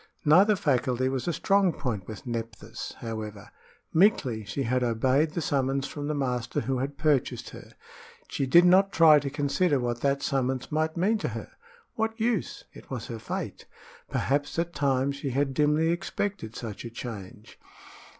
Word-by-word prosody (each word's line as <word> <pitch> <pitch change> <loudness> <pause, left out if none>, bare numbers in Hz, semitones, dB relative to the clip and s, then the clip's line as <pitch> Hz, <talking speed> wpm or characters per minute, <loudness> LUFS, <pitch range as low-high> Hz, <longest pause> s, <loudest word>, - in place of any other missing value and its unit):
Neither 190 +8 +6
faculty 130 -7 +1
was 130 +2 -3
a 170 - +1
strong 195 +2 +3
point 110 -11 -4
with 110 -2 -8
Nephthys, 115 -3 -6
however. 110 -2 -6 0.4
Meekly 160 - +3
she 105 +8 -3
had 125 +1 0
obeyed 130 +6 +2
the 170 - -2
summons 135 -1 0
from 145 0 -5
the 150 - -1
master 125 -4 -1
who 130 -1 -1
had 140 +2 -3
purchased 150 -5 0
her. - - -12 0.5
She 135 - -2
did 170 +6 +7
not 190 +2 +5
try 160 -4 +7
to 140 0 -4
consider 145 +2 +1
what 120 -1 -2
that 140 0 +1
summons 130 -1 -1
might 155 +2 0
mean 210 +6 +2
to - - -2
her. - - -6 0.4
What 225 +1 -2
use? 225 -3 -1
It - - -14
was 125 -4 -5
her 115 -2 -5
fate. - - -5 0.4
Perhaps 145 +3 -1
at 170 +1 -1
times 140 -1 0
she 140 0 -3
had 135 +1 0
dimly 150 +3 +2
expected 190 - -3
such 110 -4 -6
a 120 - -6
change. 110 -2 -9
140 Hz, 170 wpm, -27 LUFS, 125-160 Hz, 0.5 s, did